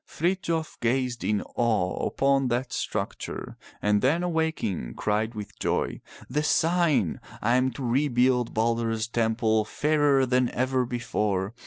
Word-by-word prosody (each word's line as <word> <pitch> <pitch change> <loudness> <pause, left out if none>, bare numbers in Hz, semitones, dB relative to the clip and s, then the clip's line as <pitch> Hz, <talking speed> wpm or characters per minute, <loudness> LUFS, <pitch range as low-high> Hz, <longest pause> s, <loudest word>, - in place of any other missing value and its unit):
Frithjof 170 -2 -2
gazed 125 0 0
in 105 -1 0
awe 110 -6 0
upon 135 -1 +2
that 125 +1 -1
structure, - - -4 0.3
and 105 0 +3
then 155 +7 +2
awaking, 160 - -1
cried 110 +2 -1
with 105 -1 -8
joy, - - -1 0.3
The 145 +4 0
sign! 155 - +2 0.2
I 120 +3 +2
am 130 +1 +3
to 130 - -6
rebuild 125 -1 +2
Balder's 115 0 0
temple 110 -1 +1
fairer 145 +2 +2
than 125 -1 +2
ever 130 0 +1
before. 105 -5 -1
125 Hz, 130 wpm, -26 LUFS, 110-140 Hz, 0.3 s, and